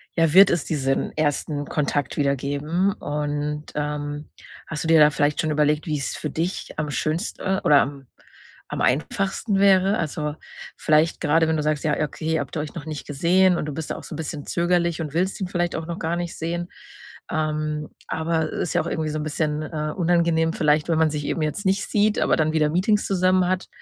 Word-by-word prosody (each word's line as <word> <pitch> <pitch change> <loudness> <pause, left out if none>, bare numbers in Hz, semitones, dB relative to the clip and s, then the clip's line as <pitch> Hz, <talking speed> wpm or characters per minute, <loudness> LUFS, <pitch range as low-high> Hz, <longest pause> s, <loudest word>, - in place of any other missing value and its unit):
ja, 165 -3 +2
wird 195 +2 +9
es 170 -3 0
diesen 135 -3 -1
1. 145 -1 -1
Kontakt 145 -1 -1
wieder 140 -1 +2
geben, 150 +8 0
und, 150 -3 -3
ähm, 150 0 -3 0.4
hast 150 -2 -4
du 160 - -2
dir 165 -1 +6
da 150 - +8
vielleicht 145 0 0
schon 155 - +1
überlegt, 150 0 +1
wie's 150 -3 -2
für 150 - -4
dich 170 +6 -3
am 150 -1 -2
schönste 170 +5 -1
oder 145 -1 +6
am 135 -1 -5 0.6
am - - -4
einfachsten 195 - 0
wäre? 195 +1 +4
Also, 150 -1 -3 0.4
vielleicht 155 +2 +2
grade, 160 +1 +3
wenn 160 - +1
du 150 - -1
sagst: 150 -1 0
„Ja, 150 - +2
okay“, 160 +2 -2
habt - - -7
ihr 150 - 0
euch 150 - -6
noch 160 -3 -6
nicht 155 -2 -6
gesehen 175 +5 +3
und - - -2
du 150 - -4
bist 160 0 -5
da - - -2
auch - - -10
so - - -7
'n - - -7
bisschen 150 -2 -5
zögerlich 170 -1 +1
und 150 -3 -5
willst 185 +4 0
ihn 190 - -1
vielleicht 175 -1 -1
auch 160 - -5
noch 170 +1 -5
gar 165 +1 -1
nicht 175 -1 -4
sehen, 170 +2 -3 0.6
ähm, 155 -1 -2 0.2
aber 160 0 -1
ist 175 - -3
ja 175 - +3
auch 165 - -5
irgendwie 160 -2 -2
so 155 - -3
'n 150 - -3
bisschen, 150 0 -1
äh, 155 0 -3
unangenehm 170 -2 +2
vielleicht, 150 0 +2
wenn 165 - +2
man 160 - +4
sich 150 -1 -3
eben 165 - -2
jetzt 155 +7 -2
nicht 190 +1 +1
sieht, 210 0 +2
aber - - +2
dann 155 0 +1
wieder 155 -1 +2
Meetings 200 +6 +2
zusammen 185 -1 +2
hat, 185 0 -1
155 Hz, 210 wpm, -23 LUFS, 150-175 Hz, 0.6 s, wird